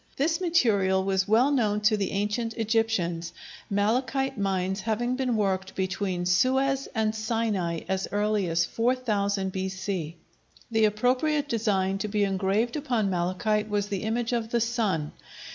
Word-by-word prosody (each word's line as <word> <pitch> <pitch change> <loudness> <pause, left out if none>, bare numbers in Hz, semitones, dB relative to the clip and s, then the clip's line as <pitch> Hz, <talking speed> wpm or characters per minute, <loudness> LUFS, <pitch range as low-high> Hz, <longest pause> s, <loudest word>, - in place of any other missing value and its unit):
This 325 +6 +1
material 205 - +2
was 190 0 0
well 235 +7 +4
known 215 -7 +1
to 215 +1 +4
the 200 -2 -1
ancient 210 +3 -2
Egyptians, 210 -7 0 0.4
malachite 255 +7 0
mines 190 -1 -1
having 235 +4 -1
been 255 -2 0
worked 190 -2 -1
between 185 -1 -2
Suez 265 +9 +2
and 220 -1 +1
Sinai 215 -7 -1
as 190 0 -1
early 205 -1 +1
as 165 +1 +2
4000 210 -5 0
B.C. 190 -3 -3 0.6
The 220 -1 +4
appropriate 255 +8 +1
design 195 -6 0
to 215 - -2
be 210 0 0
engraved 195 +4 0
upon 245 -9 0
malachite 185 +4 0
was 205 -1 -1
the 195 -3 -2
image 230 +2 -1
of 230 -2 -1
the 235 - +1
sun. 215 -10 0
210 Hz, 145 wpm, -27 LUFS, 190-235 Hz, 0.6 s, well